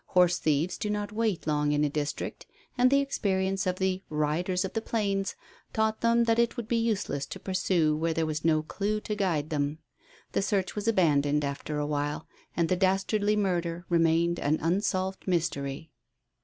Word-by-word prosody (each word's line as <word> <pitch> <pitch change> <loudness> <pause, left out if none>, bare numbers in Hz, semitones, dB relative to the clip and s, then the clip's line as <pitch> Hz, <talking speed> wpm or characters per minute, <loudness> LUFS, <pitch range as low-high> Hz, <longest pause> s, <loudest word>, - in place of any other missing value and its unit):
Horse 180 -1 +5
thieves 155 +3 0
do 210 - -2
not 205 0 -2
wait 215 -4 -1
long 150 -1 +1
in 150 0 +2
a - - +3
district, 145 0 -4 0.3
and 250 0 +4
the 280 +1 +4
experience 195 -7 0
of 180 - +1
the 190 0 -1
"riders 160 +5 0
of 190 - -6
the 225 - -1
plains" 200 -4 -1 0.4
taught 220 0 0
them 235 0 +4
that 230 0 +2
it 235 0 +1
would 235 -3 -4
be 235 - +1
useless 205 -11 -1
to - - -7
pursue 180 -5 +1
where 165 +2 0
there 160 0 0
was 155 0 -3
no 155 -1 +3
clue 210 +6 -2
to 210 - -3
guide 170 -7 -1
them. 145 0 -1 0.5
The - - +1
search 195 -2 0
was 210 +1 -4
abandoned 150 -8 +3
after 140 +2 -4
a 150 - 0
while, 145 +1 -2 0.3
and 170 -1 +2
the 185 - +2
dastardly 195 +3 +1
murder 175 -4 -1
remained 170 0 +2
an 150 +2 +1
unsolved 190 +2 -1
mystery. 160 -4 -2
180 Hz, 185 wpm, -28 LUFS, 155-205 Hz, 0.5 s, Horse